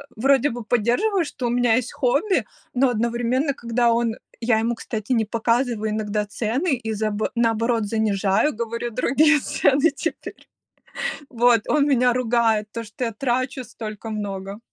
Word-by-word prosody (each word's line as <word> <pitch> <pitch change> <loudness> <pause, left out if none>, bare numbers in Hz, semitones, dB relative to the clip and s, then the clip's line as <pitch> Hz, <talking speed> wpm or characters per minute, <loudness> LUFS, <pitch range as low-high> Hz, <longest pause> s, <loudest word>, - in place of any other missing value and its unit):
вроде 270 +4 +3
бы 240 -1 -6
поддерживает, 245 - +1
что 250 - -4
у - - 0
меня 240 -1 +3
есть 250 0 -2
хобби, 290 - +1 0.3
но 260 +1 +3
одновременно, 240 +4 0
когда 235 -2 +1
он 230 -1 +1 0.2
я 230 -1 +2
ему, 230 +2 0
кстати, 220 +1 -4
не 225 -2 +2
показываю 230 0 0
иногда 210 -1 -1
цены 250 - -1
и 225 -3 -4
за 215 0 -1 0.2
наоборот 230 -1 +1
занижаю, 210 +3 +1
говорю 235 +1 -3
другие 295 +6 +3
цены 285 +2 +2
теперь. 330 +3 -5 0.9
Вот 240 -2 +3
он 295 -2 +3
меня 250 -3 +3
ругает 230 -3 +1
за 230 - -3
то, 230 - -10
что 225 +4 -4
я 230 - -2
трачу 255 +2 -1
столько 220 -2 -8
много. 200 -1 -5
235 Hz, 155 wpm, -23 LUFS, 220-255 Hz, 0.9 s, вроде